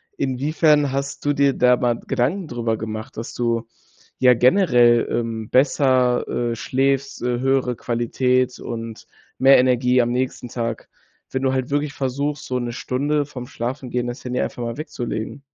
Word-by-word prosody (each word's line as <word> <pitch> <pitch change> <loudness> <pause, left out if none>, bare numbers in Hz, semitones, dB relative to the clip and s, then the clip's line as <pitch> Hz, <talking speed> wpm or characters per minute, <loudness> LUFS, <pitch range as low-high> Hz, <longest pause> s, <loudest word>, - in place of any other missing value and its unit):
Inwiefern 145 +2 +2
hast 140 +1 -4
du 145 - +2
dir 140 0 +3
da 125 0 +4
mal 120 -1 0
Gedanken 160 +9 0
drüber 115 -4 -2
gemacht, 110 0 -6
dass 115 - -6
du 115 -1 -1 0.5
ja 125 -1 +6
generell, 120 - +4
ähm, 115 -2 -3
besser, 130 -2 +3
äh, 120 -1 -1
schläfst, 135 +3 -1
äh, 125 -1 0
höhere 135 -2 +1
Qualität 125 +2 0
und 115 -1 -7 0.3
mehr 135 0 +6
Energie 125 0 +3
am 120 0 0
nächsten 125 0 -2
Tag, 115 -1 -4 0.4
wenn 130 - -3
du 135 -1 +1
halt 130 0 -2
wirklich 145 0 0
versuchst, 145 +2 -3
so 125 - -2
'ne 120 -1 -3
Stunde 145 +5 -1
vorm 125 -3 -8
Schlafengehen 125 0 -3
das 120 +1 -6
Handy 125 0 -2
einfach 120 - -3
mal 115 +1 -4
wegzulegen? 125 -3 -5
125 Hz, 160 wpm, -21 LUFS, 120-135 Hz, 0.5 s, ja